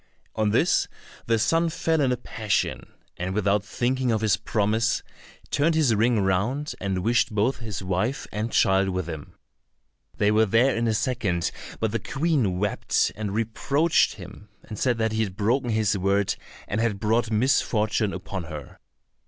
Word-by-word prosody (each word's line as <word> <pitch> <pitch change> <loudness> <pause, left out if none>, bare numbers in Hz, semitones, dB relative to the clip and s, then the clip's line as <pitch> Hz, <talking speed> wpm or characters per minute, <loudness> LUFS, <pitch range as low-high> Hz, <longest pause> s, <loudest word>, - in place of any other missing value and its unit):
On 110 -1 +1
this - - +2 0.4
the 115 -1 +3
son 165 +10 +2
fell 160 0 0
in 130 -2 +2
a 125 - 0
passion, 110 -4 -2 0.3
and 95 +2 -3
without 100 -1 +2
thinking 125 +3 -1
of 110 -1 0
his 105 -2 +3
promise, 110 +1 0 0.5
turned 155 +3 +2
his 150 -7 +3
ring 115 +1 +2
round, 105 +11 0
and 95 -2 -2
wished 115 0 +2
both 110 +6 +1
his 105 -4 -5
wife 95 +8 -1
and 110 +2 -3
child 95 0 +3
with 90 -2 -2
him. 80 -3 -8 0.8
They 105 0 +3
were 110 +1 +4
there 120 +6 +3
in 115 +1 0
a 110 - +1
second, 100 -9 -1 0.3
but - - 0
the - - -1
Queen 135 - 0
wept, 100 +2 0
and 105 -2 -4
reproached 140 +8 +1
him, - - -12
and 105 - -8
said 125 -3 +1
that 110 -1 0
he 110 +1 0
had 100 -4 -2
broken 120 +4 +1
his 110 -2 +1
word, 100 +1 +1 0.3
and 105 +3 -1
had 110 -4 0
brought 110 +2 +1
misfortune 110 -2 +1
upon 95 -3 -5
her. 75 -2 -9
110 Hz, 170 wpm, -25 LUFS, 100-120 Hz, 0.8 s, were